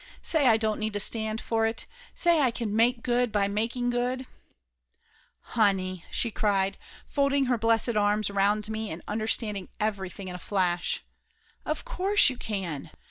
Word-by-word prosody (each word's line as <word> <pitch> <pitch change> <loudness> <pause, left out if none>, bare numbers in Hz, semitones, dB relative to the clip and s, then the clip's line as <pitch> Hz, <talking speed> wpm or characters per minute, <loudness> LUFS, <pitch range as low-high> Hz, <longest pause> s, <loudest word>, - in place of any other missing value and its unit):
"Say 305 -5 +3
I 225 -2 +6
don't 220 -1 -1
need 215 -1 -2
to 205 - -1
stand 220 +1 +1
for 225 -1 0
it. 225 - -2 0.3
Say 340 -2 +3
I 260 - +4
can 230 -3 -3
make 235 +2 +3
good 245 -1 +1
by 205 -1 +2
making 230 +4 -1
good 250 +2 -1 0.6
!" - - -36 0.2
"Honey 185 -4 +1
!" - - -24
she 235 - +1
cried, 195 -2 0 0.3
folding 280 -1 +1
her 250 -1 +1
blessed 225 +1 +2
arms 210 0 +2
around 205 +2 +2
me 220 0 -4
and 160 - -7
understanding 210 -2 -1
everything 200 -3 -3
in 180 - -5
a 180 - -7
flash. 180 -2 0 0.6
"Of - - -2
course 410 - +3
you 255 - -8
can! 185 -11 -4
220 Hz, 170 wpm, -27 LUFS, 200-245 Hz, 0.6 s, I